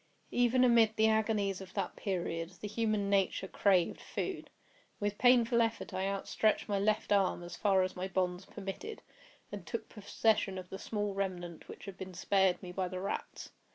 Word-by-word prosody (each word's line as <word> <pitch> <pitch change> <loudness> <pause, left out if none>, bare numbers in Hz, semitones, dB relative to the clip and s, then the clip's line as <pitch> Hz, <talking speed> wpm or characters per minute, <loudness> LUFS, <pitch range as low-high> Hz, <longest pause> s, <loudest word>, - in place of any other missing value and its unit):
Even 245 +1 +3
amid 230 -3 +5
the 220 - +4
agonies 215 -3 +1
of 185 -1 -11
that - - -2
period, 170 -4 -2
the 210 - -5
human 215 -1 0
nature 195 -1 +1
craved 185 -3 +2
food. - - -4 0.5
With 205 0 -2
painful 240 -2 +5
effort 225 0 -1
I 190 +1 -1
outstretched 200 +2 0
my 200 -2 0
left 215 +1 +1
arm 195 -3 +2
as 175 0 -7
far 195 -2 +3
as 185 - -3
my 185 +1 -3
bonds 185 -1 -1
permitted, 305 - -7 0.5
and 205 -3 -6
took 225 +7 -5
possession 210 -2 0
of 180 -1 -7
the 190 - -6
small 205 -2 -2
remnant 180 -4 -4
which - - -10
had 195 -2 -9
been 190 -1 -7
spared 190 0 +2
me 180 - -6
by 185 0 -1
the 185 0 -5
rats. 195 - -5
195 Hz, 180 wpm, -33 LUFS, 185-215 Hz, 0.5 s, amid